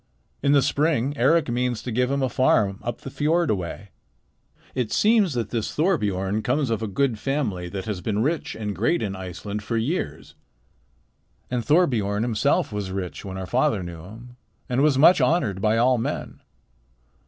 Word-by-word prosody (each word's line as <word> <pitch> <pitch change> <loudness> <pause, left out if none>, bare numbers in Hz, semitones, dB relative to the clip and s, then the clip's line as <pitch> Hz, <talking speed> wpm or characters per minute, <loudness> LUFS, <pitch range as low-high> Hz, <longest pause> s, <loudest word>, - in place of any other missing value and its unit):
In 140 +1 +3
the 140 -2 +5
spring 145 -3 +1
Eric 150 +6 +3
means 120 -1 -1
to 125 - -4
give 125 +2 +1
him 140 0 0
a - - +2
farm 105 -6 +2
up 120 -1 -5
the 135 - -8
fiord 160 +3 +1
a - - +2
way. 95 +2 -6 0.8
It 125 -4 -2
seems 210 - +3
that 115 -3 -2
this 115 -3 -3
Thorbiorn 105 - 0
comes 130 +2 0
of 115 - -1
a 110 - -2
good 115 +2 0
family 110 -11 -2
that 95 +1 -5
has 105 -5 -4
been 105 +1 -1
rich 155 +3 -1
and 105 -2 -4
great 120 - +1
in 100 -2 -3
Iceland 95 +3 -6
for 115 +2 -2
years. 140 +11 -3 1.2
And 125 -2 -1
Thorbiorn 115 - +2
himself 110 -2 +1
was 100 -2 -3
rich 95 -2 -5
when 95 -2 -6
our 95 - -4
father 125 -2 +1
knew 85 -2 -8
him, 120 +6 -12 0.3
and 125 +2 0
was 145 -2 +3
much 160 +3 +6
honored 125 - +1
by 110 +1 +2
all 125 +1 +3
men. - - -4
115 Hz, 180 wpm, -24 LUFS, 100-140 Hz, 1.2 s, much